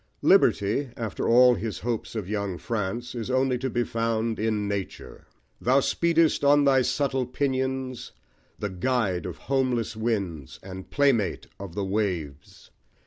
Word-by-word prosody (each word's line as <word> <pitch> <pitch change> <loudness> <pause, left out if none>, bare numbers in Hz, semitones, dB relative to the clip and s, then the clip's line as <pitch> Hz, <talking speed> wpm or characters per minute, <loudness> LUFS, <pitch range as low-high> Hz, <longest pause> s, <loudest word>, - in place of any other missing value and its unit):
Liberty, 110 +7 +3
after 110 -4 -3
all 125 +1 +7
his 115 -3 -4
hopes 115 +1 -3
of 105 -5 -3
young 100 -3 -2
France, 115 +3 -3
is 120 -1 -5
only 130 -1 +1
to 130 +1 -2
be 120 0 0
found 115 -1 -1
in 105 -2 0
nature: 100 -2 -6 0.3
Thou 130 +3 +4
speedest 165 +2 +2
on 145 +1 +5
thy 135 -1 +5
subtle 135 -1 0
pinions, 130 -1 -2 0.5
The 105 -2 -4
guide 95 -2 0
of 90 - -7
homeless 130 -4 -1
winds, 100 - -3
and 95 0 -9
playmate 135 -8 +1
of 95 -4 -8
the 100 - -1
waves! 90 -9 -3
115 Hz, 140 wpm, -26 LUFS, 100-130 Hz, 0.5 s, all